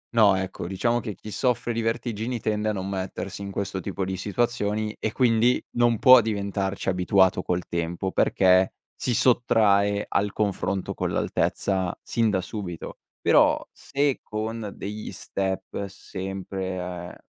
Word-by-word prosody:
No, 105 -4 +6
ecco, 95 -2 -4
diciamo 120 +6 +1
che 105 -3 -5
chi 105 +4 -10
soffre 120 +1 0
di 115 - -1
vertigini 115 +1 -2
tende 105 0 0
a - - +2
non 95 -2 -3
mettersi 95 0 -4
in 100 - -5
questo 100 -1 -3
tipo 95 0 -3
di 95 0 -3
situazioni 105 +1 -1
e 110 - -1
quindi 120 0 +3
non 120 -1 +3
può 130 -1 +8
diventarci 100 -3 -2
abituato 95 0 +3
col 90 -1 -2
tempo, 85 +3 -2
perché 95 0 +3 0.2
si 120 - -1
sottrae 105 -5 +3
al 100 0 0
confronto 100 -2 -1
con - - -2
l'altezza 95 -3 0
sin 115 -2 +1
da 95 -3 +1
subito. 90 -3 -6 0.2
Però, - - +5
se 140 -1 -1
con 110 0 -4
degli 105 +2 -6
step 95 +1 -3
sempre, 95 -2 -5
mhmm, - - -10
100 Hz, 145 wpm, -25 LUFS, 95-115 Hz, 0.2 s, può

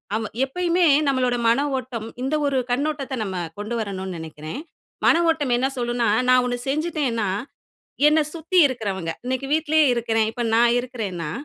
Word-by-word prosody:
ஆமா, 220 -1 -2 0.2
எப்பயுமே 350 +4 +1 0.2
நம்மளோட 255 -3 +1
மன 235 +5 +3 0.2
ஓட்டம், 240 -4 -5 0.2
இந்த 275 +3 0
ஒரு 275 -1 +1
கண்ணோட்டத்த 285 +1 -1
நம்ம 190 -2 -4 0.2
கொண்டு 215 +3 -4
வரணுன்னு 190 -4 -4
நெனைக்கிறேன். 155 - -7 0.5
மன - - +6
ஓட்டம் 290 -6 +1
என்ன 260 +2 +1
சொல்லுன்னா, 240 -1 0 0.2
நான் 255 0 +5
1 245 0 -1
செஞ்சுட்டேன்னா, 280 - -1 0.8
என்ன 310 +1 +4
சுத்தி 335 +3 0
இருக்குறவங்க, 200 -10 -3
இன்னைக்கு 260 +1 -2
வீட்லயே 315 0 +3
இருக்கிறேன், 225 -2 +1
இப்ப 240 - -3
நான் 235 +1 +5
இருக்கிறேன்னா, 200 -10 -4
245 Hz, 145 wpm, -23 LUFS, 220-285 Hz, 0.8 s, மன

